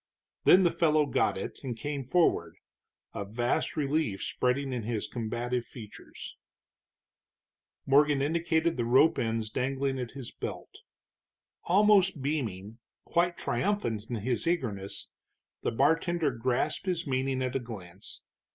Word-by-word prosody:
Then 185 +1 +7
the 170 - +4
fellow 155 -2 +3
got 140 - +1
it, 95 - -6
and 125 -4 -4
came 145 +1 -3
forward, 125 - +2 0.6
a - - -3
vast 120 +9 -1
relief 145 -8 0
spreading 130 +2 0
in 125 - -2
his 110 -1 -2
combative 120 +1 -2
features. 110 -4 -10 1.5
Morgan 145 +1 +4
indicated 160 +2 +1
the 120 - 0
rope 130 +7 +4
ends 115 -1 -1
dangling 135 +1 -1
at 125 -2 -5
his 135 -4 -8
belt. - - -7 0.9
Almost 195 -3 +4
beaming, 115 -7 -3 0.3
quite 175 0 +1
triumphant 120 - -1
in 120 - -2
his 120 +7 -2
eagerness, 110 - -2 0.5
the - - -1
bartender 160 +4 +2
grasped 125 +9 -1
his 175 -2 -1
meaning 130 -1 0
at 130 +1 -2
a - - +2
glance. 100 -6 -9
130 Hz, 130 wpm, -29 LUFS, 115-155 Hz, 1.5 s, Then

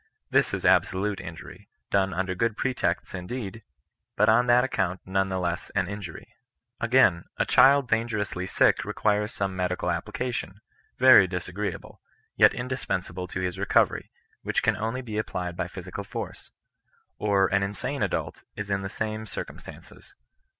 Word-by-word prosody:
This - - +3
is - - -3
absolute 100 +2 +2
injury, 80 -1 -10 0.2
done 95 -1 +2
under 95 +1 -1
good 110 +3 -1
pretexts 130 -1 -1
indeed, 100 +3 -5 0.5
but 105 +1 +4
on 120 +3 +4
that 120 +1 +5
account 95 -8 -1
none 95 +1 0
the 95 - -1
less 85 -1 -2
an 95 -2 +2
injv/ry. 100 -3 -7 0.5
Again; 115 -8 +4
a - - +2
child 140 -1 +5
dangerously 110 -5 -1
sick - - +3
requires 105 0 0
some 100 -4 -2
medical 90 0 -1
application, 120 -6 -4 0.4
very 130 -7 +8
disagreeable, 90 +2 -5 0.3
yet - - +6
indis 130 +2 -4
pensable 90 0 -3
to 95 - -4
his 90 0 -3
recovery, 100 - +2 0.3
which - - -1
can - - +3
only 115 +4 -3
be 110 -3 -3
applied 90 -4 -3
by - - -2
physical - - -7
force. - - -7 0.7
Or 100 -2 +3
an 100 - +3
insane 100 -1 -3
adult - - -2
is 105 -1 -5
in 100 0 +1
the 95 - -4
same 110 +1 -4
cir - - -4
'cumstances. - - -14
100 Hz, 155 wpm, -26 LUFS, 95-115 Hz, 0.7 s, very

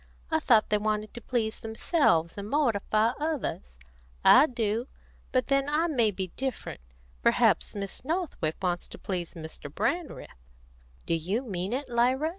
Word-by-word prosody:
I 320 - +3
thought 235 -8 +4
they 210 - +3
wanted 215 0 -1
to 240 - -8
please 225 -3 -1
themselves 220 - +1
and 200 +1 -6
mortify 225 -5 +2
others. 285 - -3 0.5
I 290 - +8
do. 230 -1 -1 0.4
But 255 -1 +2
then 275 0 +1
I 305 +3 +2
may 250 -10 +2
be 190 -2 -4
different. 255 - -5 0.4
Perhaps - - +3
Miss 200 +2 -5
Northwick 305 - -2
wants 175 -1 -1
to - - -10
please 180 -3 -4
Mr. 160 -3 -8
Brandreth." 325 - -3 0.6
"Do - - 0
you 185 +10 -1
mean 190 -4 -3
it, 270 +4 -2
Lyra?" 255 +6 +2
225 Hz, 150 wpm, -28 LUFS, 190-275 Hz, 0.6 s, I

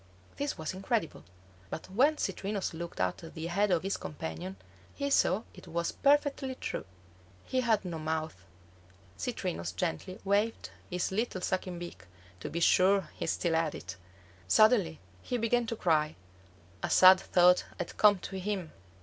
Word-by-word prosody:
This 285 0 -2
was 160 +3 -4
incredible; 190 - -2 0.5
but 160 - -6
when 280 +10 +3
Citrinus 200 -2 -2
looked 170 +1 -7
at 90 0 0 0.2
the 160 0 -5
head 200 +5 +1
of 175 -3 +2
his 195 +1 -1
companion, 90 - -6 0.4
he 280 0 -2
saw 210 -5 +3
it 180 - -14
was 170 0 -1
perfectly 280 -2 +2
true. - - -4 0.6
He 255 - 0
had 220 -5 +1
no 170 -3 -4
mouth. 155 0 -2 0.8
Citrinus 85 -3 -3
gently 90 - -3
waved 205 +3 0 0.2
his 180 0 -1
little 200 -2 -1
sucking 185 -1 -2
beak, 170 - -8 0.3
to - - -5
be 170 - -3
sure 190 0 +4
he - - -4
still 170 0 0
had 160 -1 +1
it. 95 - -7 0.5
Suddenly 200 - +4 0.2
he 250 - -2
began 235 +1 +1
to 230 - -2
cry; 155 -6 +1 0.7
a - - -2
sad 185 0 +8
thought 180 0 +4
had 175 - -5
come 210 -2 +6
to 190 +1 -6
him. 185 -4 -3
185 Hz, 155 wpm, -31 LUFS, 160-215 Hz, 0.8 s, sad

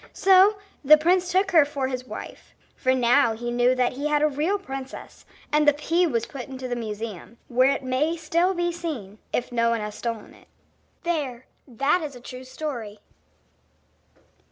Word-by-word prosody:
So 390 +2 +5 0.3
the 305 +2 +8
prince 355 +3 +2
took 385 +2 +2
her 325 -4 +7
for 285 -2 -3
his 255 -1 -5
wife, - - -9 0.2
for 260 - +1
now 245 0 +3
he 240 +2 -5
knew 245 +1 +3
that 250 -1 +1
he 280 +4 -3
had 300 0 +2
a - - +5
real 305 +8 0
princess; 270 -8 -9 0.3
and 300 0 +3
the 295 - +7
pea 335 +4 +1
was 235 -6 -1
put 270 -3 -8
in 265 - -8
the 255 -1 -4
museum, 220 -1 -6
where 255 +2 +4
it 275 - -1
may 280 +6 0
still 335 +4 +1
be 345 0 0
seen, 275 - -6
if 245 - -2
no 235 -1 +2
one 230 -1 0
has 210 0 -5
stolen 230 -1 -5
it. - - -20 0.6
There, 280 -8 -2 0.2
that 275 +8 +1
is 295 -4 -6
a - - -10
true 255 +1 -10
story. 245 -7 -6
270 Hz, 180 wpm, -24 LUFS, 240-320 Hz, 0.6 s, the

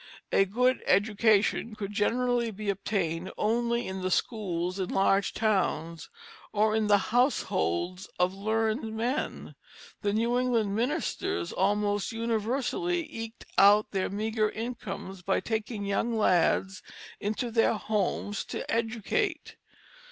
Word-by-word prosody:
A 195 - +4
good 250 +6 +1
education 215 +2 +3
could 205 -1 -5
generally 240 +3 +1
be 210 -1 -2
obtained 185 -3 -2
only 235 +2 +1
in 190 0 -4
the 185 - -1
schools 185 -3 -1
in 185 - -2
larger 195 0 +2
towns, 170 -7 0 0.4
or 215 +1 +2
in 220 -1 +1
the 205 -1 +6 0.2
households 185 - +1
of 180 +1 +2
learned 220 +3 -1
men. 250 +6 -2 0.5
The 205 - +1
New 235 +3 +1
England 230 -5 +1
ministers 255 - -1
almost 205 +2 +1
universally 245 - -1
eked 225 0 -7
out 205 +2 +6
their 190 -2 -1
meagre 215 +1 0
incomes 215 -5 -6
by 190 +2 +1
taking 220 -2 -3
young 225 +3 0
lads 190 0 +2 0.4
into 220 +3 -2
their 225 0 +3
homes 205 -1 -1
to - - -5
educate. 230 - -1
215 Hz, 120 wpm, -28 LUFS, 195-230 Hz, 0.5 s, the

